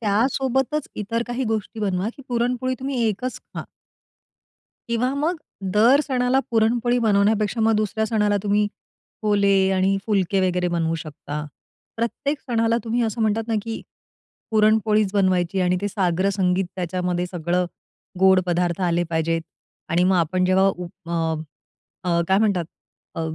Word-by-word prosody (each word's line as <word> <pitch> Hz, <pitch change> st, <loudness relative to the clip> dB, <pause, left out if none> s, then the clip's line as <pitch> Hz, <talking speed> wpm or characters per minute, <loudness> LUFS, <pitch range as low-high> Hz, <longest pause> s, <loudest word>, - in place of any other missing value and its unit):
त्यासोबतच 265 Hz, +6 st, 0 dB
इतर 230 Hz, +3 st, -2 dB
काही 245 Hz, +2 st, -2 dB
गोष्टी 220 Hz, 0 st, -3 dB
बनवा, 195 Hz, 0 st, 0 dB
की 275 Hz, -, -11 dB
पुरणपोळी 250 Hz, +1 st, 0 dB
तुम्ही 265 Hz, -2 st, -2 dB
एकच 250 Hz, +5 st, -3 dB, 0.2 s
खा. -, -, -5 dB, 1.2 s
किंवा 235 Hz, +3 st, 0 dB
मग 315 Hz, +5 st, 0 dB, 0.4 s
दर 240 Hz, +7 st, +5 dB
सणाला 255 Hz, -1 st, +2 dB
पुरणपोळी 235 Hz, +2 st, +2 dB
बनवण्यापेक्षा 215 Hz, 0 st, +2 dB
मग 225 Hz, 0 st, +4 dB
दुसऱ्या 215 Hz, +1 st, 0 dB
सणाला 210 Hz, -2 st, +1 dB
तुम्ही 205 Hz, 0 st, +2 dB, 0.6 s
पोले 205 Hz, -1 st, +3 dB, 0.2 s
आणि 190 Hz, +1 st, +2 dB
फुलके 195 Hz, -2 st, +1 dB
वगैरे 180 Hz, 0 st, 0 dB
बनवू 165 Hz, -1 st, 0 dB
शकता. 150 Hz, -2 st, -6 dB, 0.5 s
प्रत्येक 280 Hz, +6 st, -2 dB
सणाला 230 Hz, -2 st, +1 dB
तुम्ही 235 Hz, +2 st, 0 dB
असं 225 Hz, 0 st, -2 dB
म्हणतात 220 Hz, +1 st, 0 dB
ना, 225 Hz, -, 0 dB
की 225 Hz, 0 st, -5 dB, 0.7 s
पुरणपोळीच 215 Hz, -2 st, +3 dB
बनवायची 185 Hz, -2 st, +1 dB
आणि 180 Hz, 0 st, +2 dB
ते 205 Hz, -, -1 dB
साग्रसंगीत 185 Hz, 0 st, +1 dB
त्याच्यामध्ये 180 Hz, 0 st, -1 dB
सगळं 175 Hz, 0 st, -1 dB, 0.6 s
गोड 190 Hz, -1 st, +6 dB
पदार्थ 175 Hz, 0 st, 0 dB
आले 170 Hz, 0 st, +1 dB
पाहिजेत 165 Hz, 0 st, 0 dB, 0.5 s
आणि 175 Hz, +2 st, +2 dB
मग 185 Hz, 0 st, +3 dB
आपण 180 Hz, +2 st, +1 dB
जेव्हा 185 Hz, +1 st, +3 dB, 0.5 s
अ, 165 Hz, -1 st, 0 dB, 0.7 s
अ, 170 Hz, 0 st, +2 dB
काय 190 Hz, -, +4 dB
म्हणतात 200 Hz, -5 st, +2 dB, 0.5 s
अ, -, -, -4 dB
205 Hz, 135 wpm, -23 LUFS, 180-230 Hz, 1.2 s, गोड